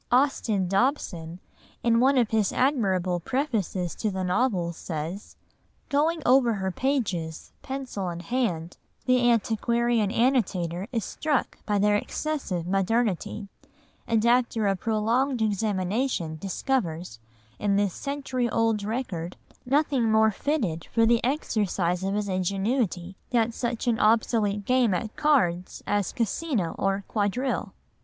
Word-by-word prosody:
Austin 245 -7 +2
Dobson 185 - -1 0.4
in 230 -1 +4
one 265 +2 +4
of 240 -3 +2
his 215 -3 +2
admirable 190 -10 +1
prefaces 200 - -1
to 215 - -2
the 190 -1 -3
novels 180 -3 0
says: 165 +4 -6 0.5
"Going 310 +3 +1
over 250 -2 +5
her 190 -2 -2
pages, 195 - -2
pencil 260 -9 -4
in 170 0 -5
hand, 180 -6 -2 0.3
the 250 -1 +4
antiquarian 235 -1 +1
annotator 200 -7 +1
is 230 -5 -1
struck 300 -4 -2
by 205 -1 +2
their 205 +1 +3
excessive 205 - -3
modernity, 200 +1 0 0.6
and 225 -1 +2
after 235 -2 +2
a 195 -1 +2
prolonged 230 +6 0
examination 205 -3 -1
discovers, 180 - -2 0.4
in 205 -1 +1
this 200 -2 +1
century 265 -3 -2
old 225 -2 +1
record, 200 -7 -4 0.3
nothing 270 -4 +2
more 220 0 +5
fitted 205 - -2
for 230 -1 +2
the 235 0 +3
exercise 200 - 0
of 195 +1 -1
his 210 -1 -1
ingenuity 190 0 -1
that 235 -1 +1
such 240 0 -3
an 235 -2 +1
obsolete 215 -2 +2
game 250 -6 +3
at 215 +5 -4
cards 185 - +1
as 205 -3 0
'Casino' 230 - -1
or 195 0 0
'quadrille. 220 +5 -1
215 Hz, 125 wpm, -26 LUFS, 185-250 Hz, 0.6 s, over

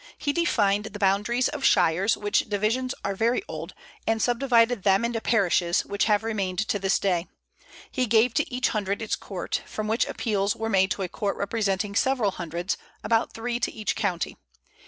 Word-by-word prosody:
He 285 - -1
defined 210 -12 +2
the 210 -1 -7
boundaries 205 +5 +2
of 295 -2 -5
shires, 185 +1 +3
which 205 +1 0
divisions 225 +6 0
are 200 - 0
very 235 - +1
old, - - -7 0.3
and 225 0 +2
subdivided 240 -2 +3
them 195 +3 +3
into 235 -1 -2
parishes, 180 -6 +2
which 200 0 0
have 210 -1 +2
remained 200 -5 -2
to 205 - +1
this 195 0 +2
day. 180 -3 0 0.6
He 255 -2 0
gave 225 +2 +4
to 305 0 0
each 250 0 +1
hundred 200 -2 -1
its 220 - -1
court, 190 -3 -4
from 215 0 -4
which 220 +2 +1
appeals 200 -3 -1
were 225 0 -3
made 190 -2 +3
to 195 - -2
a - - -2
court 200 +2 -3
representing 200 -1 -1
several 240 -2 +2
hundreds, 175 +1 -3 0.3
about 225 -1 +1
three 235 +1 -3
to - - -1
each 215 -2 -2
county. 180 -5 -2
210 Hz, 180 wpm, -26 LUFS, 195-235 Hz, 0.6 s, gave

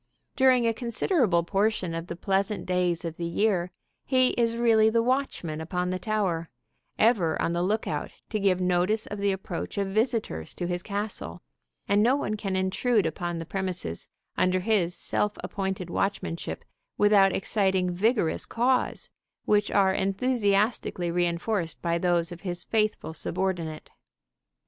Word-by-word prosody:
During 255 -2 +4
a 230 - +2
considerable 235 - +1
portion 195 -1 0
of 165 +1 -4
the 170 - -5
pleasant 195 +3 -1
days 180 -2 0
of 165 -1 -5
the 170 - -3
year 180 0 +1 0.3
he 255 -1 +3
is 230 -1 0
really 225 -2 +4
the 230 +1 +2
watchman 240 - -1
upon 180 +2 -2
the 185 - -2
tower, 185 -7 -1 0.5
ever 200 -8 +3
on 170 - 0
the 170 - 0
lookout 210 +5 -1 0.2
to 215 - 0
give 190 -2 +2
notice 180 +4 +1
of 205 - -6
the 200 0 +2
approach 190 -1 -5
of 200 -1 0
visitors 215 - -1
to 175 - -3
his 175 0 -2
castle, 200 - -5 0.5
and 200 +1 +3
no 245 +5 +4
one 215 -7 -2
can 195 -3 -3
intrude 190 +3 +1
upon 175 +2 -3
the 165 - -5
premises 180 - -3 0.3
under 185 0 +2
his 185 -4 +1
self 210 0 0
appointed 190 -3 -3
watchmanship 185 -4 -2 0.3
without 205 -2 +5
exciting 190 -2 +1
vigorous 210 -2 +1
caws, 250 +2 0 0.3
which 210 -1 +2
are 195 -2 +3
enthusiastically 200 -3 +1
reinforced 175 +1 -1
by 170 0 0
those 175 -1 +1
of 175 0 -9
his 175 -2 -4
faithful 215 -7 -1
subordinate. 170 -2 -3
190 Hz, 150 wpm, -27 LUFS, 175-215 Hz, 0.5 s, without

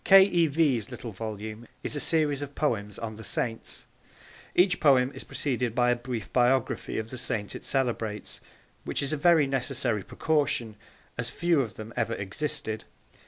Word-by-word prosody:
K. 195 0 +9
E. 175 -4 +3
V.'s 140 -7 +1
little 120 -2 -7
volume 110 +2 -6 0.2
is - - -1
a - - -1
series 150 -3 +3
of 145 0 -6
poems 105 -9 -1
on 110 -2 -6
the 110 - -9
Saints. 115 +1 -1 0.7
Each 180 0 +4
poem 135 -3 +4
is - - -8
preceded 125 -4 -2
by 125 0 +4
a - - +3
brief 120 -3 -6
biography 125 0 +1
of 110 +1 -4
the 130 - -5
Saint 105 -4 -2
it - - -8
celebrates 115 -5 -1 0.4
which - - -2
is 140 +2 -1
a - - +2
very 160 0 +5
necessary 130 -4 0
precaution, 130 - 0 0.4
as - - -1
few 170 -4 +2
of 110 -7 -5
them 110 +1 -8
ever 115 - 0
existed. 110 +2 -2
125 Hz, 170 wpm, -28 LUFS, 110-145 Hz, 0.7 s, K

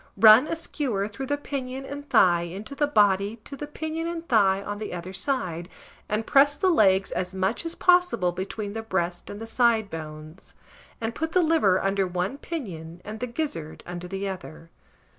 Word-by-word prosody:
Run 220 +6 +8
a - - -1
skewer 255 -11 -2
through 265 +6 -6
the 290 +1 0
pinion 270 -2 -5
and 285 +1 -8
thigh 175 -2 +5
into 190 +9 -6
the 290 +1 +1
body 205 -4 +3
to 280 - -8
the 295 +1 -6
pinion 315 +2 -4
and 335 0 -5
thigh 200 -4 +3
on 205 0 -5
the 215 - -5
other 175 +2 -7
side, 185 - -2 0.4
and 215 +1 -1
press 285 +1 +4
the 375 -1 +3
legs 195 - +4
as 180 +1 -3
much 195 - -1
as 330 - -6
possible 355 - +3
between 200 +3 -5
the 225 - -3
breast 180 -5 -2
and 205 - -7
the 225 - -6
side 225 -2 +2
bones, 155 +1 -9 0.4
and 225 0 -3
put 320 +4 -3
the 365 - +4
liver 310 - +3
under 195 -1 +1
one 180 +9 -2
pinion 175 - -6
and 215 +1 -6
the 250 - -2
gizzard 235 - -4
under 175 0 -6
the 195 +2 -3
other. 170 -3 -8
210 Hz, 190 wpm, -26 LUFS, 185-280 Hz, 0.4 s, Run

